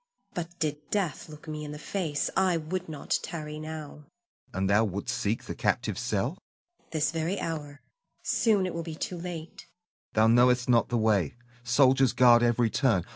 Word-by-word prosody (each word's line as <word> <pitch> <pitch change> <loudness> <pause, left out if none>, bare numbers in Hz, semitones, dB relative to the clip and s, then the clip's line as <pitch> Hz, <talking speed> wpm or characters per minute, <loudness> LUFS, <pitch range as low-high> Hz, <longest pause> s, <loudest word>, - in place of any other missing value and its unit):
But 175 0 -5
did 150 -3 -1
death 180 -8 -1
look 155 +1 -12
me 155 0 -5
in 150 0 -6
the - - -7
face, 160 -3 -2
I 185 -2 +3
would 170 +3 -4
not 150 -3 -1
tarry 150 -2 -6
now. 155 -2 -8 0.4
Hassan. - - -8
And 95 0 +1
thou 100 +3 +4
wouldst 100 -2 -2
seek 105 +3 -1
the - - -5
captive's - - -1
cell? 120 - -1
Zuleika. 350 0 -42
This 155 -2 +1
very 165 +4 -1
hour. 145 -3 -5 0.4
Soon 210 -5 +2
it 185 - -3
will 170 - -3
be 165 -1 -6
too 175 +2 -4
late. 170 -2 -7
Hassan. 175 +1 -47
Thou 110 +1 +4
knowest 125 0 +4
not 120 -2 +3
the 120 - +1
way, 105 -8 +2 0.3
soldiers 130 +1 +4
guard 120 -1 +6
every 120 -1 +2
turn. 110 - +2
150 Hz, 185 wpm, -28 LUFS, 120-165 Hz, 0.4 s, guard